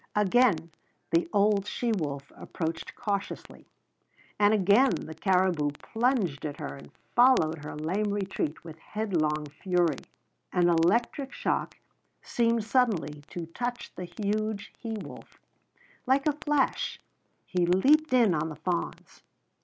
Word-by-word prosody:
Again 205 -5 +3 0.4
the 165 0 +2
old 205 -1 +3
she 240 +2 -1
wolf 145 -8 -3
approached 165 -1 -5
cautiously, 200 -1 -4 0.7
and 205 0 +5
again 215 +5 +5
the 160 - -4
caribou 180 -3 +2
plunged 225 - 0
at 145 -2 -5
her 70 - -5
and 70 +1 -13 0.2
followed 165 - +4
her 150 - -6
lame 190 +8 -1
retreat 190 -6 -3
with 160 -1 -10
headlong 160 -8 -1 0.2
fury. 175 -5 +2 0.5
An 175 -1 +3
electric 225 - +2
shock - - -2 0.5
seemed 230 -1 +1
suddenly 210 - +1
to 175 -2 -6
touch 245 0 -4
the 180 - -6
huge 210 +3 -3
he 230 -2 -6
wolf. 215 - -9 0.7
Like 270 +2 +3
a 300 - +3
flash 295 -2 0 0.5
he 180 -2 0
leaped 280 - +4
in 235 -7 +5
on 155 0 -1
the 155 - -7
fawns. 175 +1 -4
195 Hz, 130 wpm, -28 LUFS, 165-230 Hz, 0.7 s, and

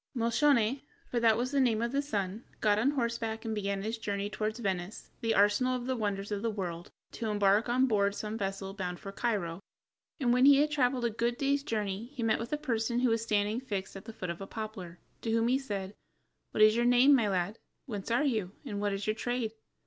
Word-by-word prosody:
Moscione 240 +1 +2 0.3
(for 240 - +1
that 225 -2 +4
was 250 +2 -1
the 280 - +2
name 235 -5 +3
of 235 +1 -1
the 280 +1 +1
son) 210 -5 -3 0.2
got 210 -1 +3
on 250 +6 +3
horseback 235 -4 -2
and 220 - -2
began 200 -2 -2
his 225 +2 -3
journey 205 -1 -3
toward 215 +1 -2
Venice, 195 -3 -4
the 225 -1 +1
arsenal 210 +6 +3
of 245 -1 -4
the 260 0 -1
wonders 205 -3 -2
of 205 -1 -2
the 230 - 0
world, 175 -5 -4 0.2
to 230 - -4
embark 205 +2 +3
on 255 +2 +3
board 200 -4 +2
some 215 +1 -4
vessel 195 -2 -3
bound 180 -3 -4
for 195 - -7
Cairo, 195 -7 -2 0.6
and 245 -4 +2
when 250 +1 +5
he 280 0 +8
had 300 +2 +3
traveled 255 -4 +1
a 235 - +1
good 235 +2 -1
day's 280 0 +1
journey 210 -5 -2
he 240 - -3
met 225 -1 +2
with 230 +1 -5
a 300 - +1
person 235 -4 -1
who 250 - +3
was 225 0 +1
standing 210 +1 0
fixed 200 -8 -4
at 195 - -9
the 225 - -8
foot 185 -5 -4
of 170 - -8
a 195 - -6
poplar, 205 -6 -7 0.2
to 230 - -3
whom 230 +1 +2
he 260 +2 +3
said: 200 -7 -4 0.6
"What 215 - +3
is 215 0 +7
your 235 - +2
name, 245 +4 +6
my 235 -6 +4
lad, 190 +3 -1 0.3
whence 210 -7 -5
are 240 +6 +2
you, 215 -8 -1
and 205 -5 -4
what 205 -1 0
is 195 0 -3
your 215 - +1
trade?" 240 0 -2
220 Hz, 235 wpm, -31 LUFS, 200-245 Hz, 0.6 s, he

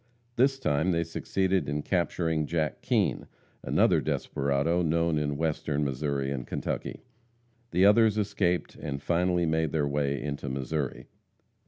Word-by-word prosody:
This 135 +2 +3
time 80 - +1
they 85 0 +1
succeeded 95 0 -1
in 75 0 -2
capturing 80 -4 0
Jack 80 -2 -1
Kean, - - 0 0.3
another - - +3
desperado, 70 +5 0
known 85 -1 +1
in 75 -1 -2
Western 75 -2 -1
Missouri 70 0 -1
and 65 -3 -4
Kentucky. - - -4 0.7
The 90 +3 +3
others 110 +1 +5
escaped, 95 -4 0
and 70 -1 -5
finally 90 +3 +1
made 80 -1 0
their 75 -3 +1
way 70 -1 0
into 70 -1 -4
Missouri. 70 +1 -3
80 Hz, 135 wpm, -28 LUFS, 70-90 Hz, 0.7 s, others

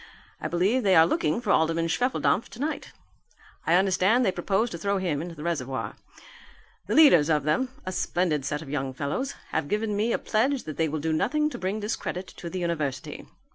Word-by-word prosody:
I - - -2
believe 195 +9 +1
they 195 -4 +4
are 160 - +8
looking 155 +4 0
for - - 0
Alderman 165 +1 +2
Schwefeldampf 235 +2 +1
tonight. 290 +7 -4 0.8
I 165 - +5
understand 195 +6 +3
they 190 - +3
propose 195 +6 0
to 170 - -6
throw 200 +3 0
him 170 -6 -1
into 170 0 -7
the 150 - -8
reservoir. 135 -6 -3 0.9
The - - 0
leaders 175 - +7
of 150 -3 +2
them 250 - +1 0.2
a 185 - -3
splendid 175 -5 0
set 150 +2 -3
of 140 - -11
young 135 -2 -2
fellows 150 - -3
have 160 -2 -1
given 210 +3 -1
me 215 +3 +1
a - - +2
pledge 255 +5 0
that 155 - -7
they 160 -1 +1
will 155 +1 -2
do 160 +1 0
nothing 300 - +1
to - - -6
bring 190 +4 -2
discredit 190 -3 -4
on 170 - -4
the 185 - -5
university." 155 -7 -3
175 Hz, 200 wpm, -26 LUFS, 155-215 Hz, 0.9 s, are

